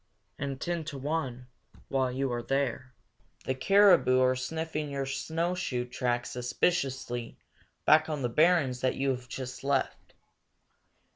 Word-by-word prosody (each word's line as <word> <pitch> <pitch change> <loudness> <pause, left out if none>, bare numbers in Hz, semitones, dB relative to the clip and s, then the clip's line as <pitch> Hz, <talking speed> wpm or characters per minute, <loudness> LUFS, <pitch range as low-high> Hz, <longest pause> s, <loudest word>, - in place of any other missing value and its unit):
And, 140 -1 -3
ten 170 +1 -2
to 150 -2 -6
one, 135 -3 -3 0.4
while 130 -2 0
you 130 0 -1
are 120 - -2
there, 130 -1 -2 0.5
the 130 - 0
caribou 180 -2 +5
are 130 0 +3
sniffing 155 +3 -3
your 140 -1 -2
snowshoe 160 -1 -2
track 120 0 -1
suspiciously 125 -2 -1 0.5
back 155 +1 +5
on 150 -3 -3
the - - +2
barrens 140 -2 +3
that 130 - +1
you 135 0 +1
have 125 -1 -5
just 130 -1 -6
left. 135 -1 -1
135 Hz, 135 wpm, -29 LUFS, 125-155 Hz, 0.5 s, caribou